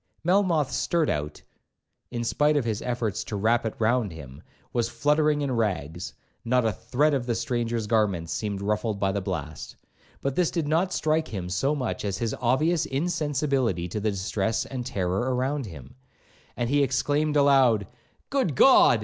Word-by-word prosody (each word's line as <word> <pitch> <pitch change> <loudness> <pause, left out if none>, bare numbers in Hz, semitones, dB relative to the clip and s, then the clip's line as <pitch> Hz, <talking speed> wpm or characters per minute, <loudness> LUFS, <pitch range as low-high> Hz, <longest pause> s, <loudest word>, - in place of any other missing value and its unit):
Melmoth's 175 -5 +2
surtout, 75 - -1 0.7
in 120 -1 -3
spite 150 +5 +2
of 135 - 0
his 110 -2 -2
efforts 120 -5 -2
to 105 - -5
wrap 115 +3 +2
it 110 - -5
round 115 -2 +1
him, 70 -3 -10 0.3
was 120 -1 0
fluttering 150 +4 +2
in 140 - -1
rags,—not 110 - -2
a 110 - +2
thread 145 +10 +1
of 130 -3 -1
the 120 - 0
stranger's 120 -1 -1
garments 100 -7 0
seemed 100 0 -3
ruffled 105 0 -1
by 95 -1 +1
the 100 +1 -2
blast. 80 -6 -5 0.4
But 140 - -2
this 180 -3 +2
did 165 -4 -2
not 165 +5 +1
strike 155 -2 0
him 95 -5 -5
so 135 +11 +1
much 130 -3 -3
as 100 -2 -2
his 115 -2 -2
obvious 155 +7 +2
insensibility 140 - 0
to 105 - -3
the 110 +1 0
distress 100 +2 -1
and 130 -2 -5
terror 100 +1 -1
around 130 0 -1
him, 70 -8 -11 0.6
and 120 0 0
he 145 0 +3
exclaimed 145 +3 +1
aloud, 135 -7 +4 0.5
'Good 260 - +1
God! 130 - +6
120 Hz, 165 wpm, -26 LUFS, 100-145 Hz, 0.7 s, God